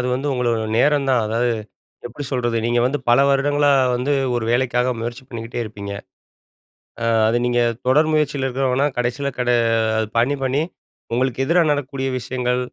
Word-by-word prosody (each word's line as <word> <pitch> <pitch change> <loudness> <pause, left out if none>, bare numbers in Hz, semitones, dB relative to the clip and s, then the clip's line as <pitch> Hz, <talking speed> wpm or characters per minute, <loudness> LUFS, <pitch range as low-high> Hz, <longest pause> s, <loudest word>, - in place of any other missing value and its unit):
அது 125 - -1
வந்து 140 +3 -2
உங்களோட 120 -3 0 0.2
நேரம் 145 0 +3
தான். 125 -2 +3
அதாவது, 115 +2 0 0.5
எப்படி 130 +4 -7
சொல்றது. 120 -3 -1
நீங்க 120 0 +1
வந்து 145 +3 -1
பல 120 +3 +5
வருடங்களா 145 +1 +2 0.3
வந்து, 135 +4 -1 0.2
ஒரு 120 - -2
வேலைக்காக 125 0 +1
முயற்சி 120 +3 -5
பண்ணிக்கிட்டே 115 -1 -6
இருப்பீங்க. 100 -2 -7 1.1
அ, 115 - -1 0.2
அது 115 +2 +2
நீங்க 120 0 +1 0.3
தொடர் 155 +4 +4
முயற்சியில 145 -3 0
இருக்கிறவங்கனா, 130 +2 +1
கடைசியில 125 +3 -1
கட 125 0 +1 0.5
அது 110 - -1
பண்ணி 130 +5 +2
பண்ணி 135 +3 +1 0.5
உங்களுக்கு 130 +1 0
எதிரா 170 +3 +3
நடக்கக்கூடிய 135 -2 -2
விஷயங்கள், 125 +1 -1
125 Hz, 155 wpm, -20 LUFS, 120-140 Hz, 1.1 s, பல